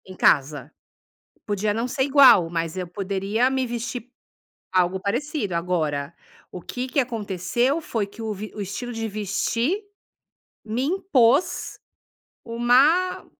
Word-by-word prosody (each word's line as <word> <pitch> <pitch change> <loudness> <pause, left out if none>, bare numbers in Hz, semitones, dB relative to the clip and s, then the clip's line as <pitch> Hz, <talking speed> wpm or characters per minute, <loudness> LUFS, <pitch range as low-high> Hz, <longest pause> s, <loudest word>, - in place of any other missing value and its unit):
Em 185 - -11
casa. 140 -3 +2 0.8
Podia 205 0 0
não 230 +4 -2
ser 265 +1 -1
igual, 265 - +6
mas 165 0 -3
eu 185 -1 -3
poderia 200 +6 -1
me 265 -1 0
vestir 240 +1 -5 0.6
algo 185 0 +2
parecido. 240 - -2
Agora, 160 -4 -1 0.4
o 180 - -8
que 250 +8 -5
que 255 - -3
aconteceu? 235 - -1
Foi 225 -9 -2
que 210 +3 -11
o 220 -1 -2
vi 210 +1 -7
o 210 - -7
estilo 205 +5 -5
de 225 -1 -3
vestir, 215 - -1 0.8
me 225 +3 -2
impôs 295 -5 +2 0.7
uma 265 +10 +3
220 Hz, 130 wpm, -23 LUFS, 185-255 Hz, 0.8 s, igual